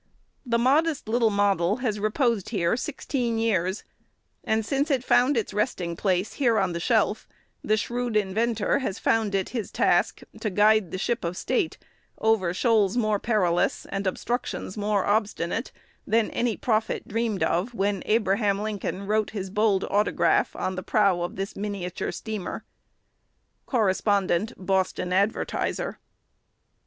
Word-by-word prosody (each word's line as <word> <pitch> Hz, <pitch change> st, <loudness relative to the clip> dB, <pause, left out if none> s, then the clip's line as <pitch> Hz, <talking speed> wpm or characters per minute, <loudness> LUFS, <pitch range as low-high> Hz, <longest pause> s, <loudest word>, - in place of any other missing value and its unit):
The 235 Hz, -1 st, +2 dB
modest 285 Hz, +4 st, +2 dB
little 230 Hz, 0 st, +3 dB
model 200 Hz, -2 st, +2 dB
has 230 Hz, -5 st, -2 dB
reposed 215 Hz, 0 st, 0 dB
here 190 Hz, -4 st, +1 dB
sixteen 250 Hz, -3 st, -2 dB
years; 195 Hz, -4 st, 0 dB, 0.6 s
and, 220 Hz, 0 st, 0 dB
since 280 Hz, +6 st, 0 dB
it 265 Hz, -4 st, +1 dB
found 255 Hz, +2 st, +3 dB
its 220 Hz, -, -2 dB
resting 190 Hz, -5 st, -1 dB
place 185 Hz, +2 st, 0 dB
here 240 Hz, -5 st, +2 dB
on 190 Hz, -3 st, +1 dB
the 170 Hz, -, -3 dB
shelf, 220 Hz, +2 st, +1 dB, 0.4 s
the 215 Hz, -, +2 dB
shrewd 240 Hz, +1 st, -1 dB
inventor 215 Hz, +4 st, +1 dB
has 215 Hz, -7 st, -3 dB
found 220 Hz, -3 st, +1 dB
it 190 Hz, -1 st, -1 dB
his 230 Hz, -5 st, -4 dB
task -, -, +1 dB, 0.2 s
to 215 Hz, -, -1 dB
guide 210 Hz, -1 st, +4 dB
the 185 Hz, -, -4 dB
Ship 235 Hz, +5 st, -1 dB
of 170 Hz, +1 st, -3 dB
State 395 Hz, -8 st, -1 dB, 0.4 s
over 220 Hz, -6 st, +2 dB
shoals 215 Hz, +1 st, +2 dB
more 215 Hz, -3 st, +1 dB
perilous, 185 Hz, -7 st, +1 dB
and 195 Hz, 0 st, -2 dB
obstructions 235 Hz, 0 st, -3 dB
more 205 Hz, -2 st, 0 dB
obstinate, 210 Hz, +1 st, -1 dB, 0.4 s
than 225 Hz, -1 st, +2 dB
any 235 Hz, -3 st, 0 dB
prophet 220 Hz, -2 st, -1 dB
dreamed 225 Hz, -2 st, -1 dB
of 195 Hz, +8 st, 0 dB
when 200 Hz, -1 st, 0 dB
Abraham 205 Hz, -2 st, +2 dB
Lincoln 205 Hz, -2 st, -3 dB
wrote 215 Hz, +1 st, +1 dB
his 195 Hz, -3 st, -5 dB
bold 205 Hz, -2 st, +2 dB
autograph 205 Hz, +1 st, +2 dB
on 185 Hz, -, -2 dB
the 185 Hz, -, -4 dB
prow 195 Hz, -2 st, +2 dB
of 175 Hz, -, -3 dB
this 195 Hz, +1 st, -4 dB
miniature 195 Hz, -3 st, -4 dB
steamer." 215 Hz, -5 st, -5 dB, 1.0 s
Correspondent 205 Hz, -2 st, +1 dB
Boston 185 Hz, -1 st, -1 dB
Advertiser. 205 Hz, -, -1 dB
210 Hz, 145 wpm, -26 LUFS, 195-230 Hz, 1.0 s, guide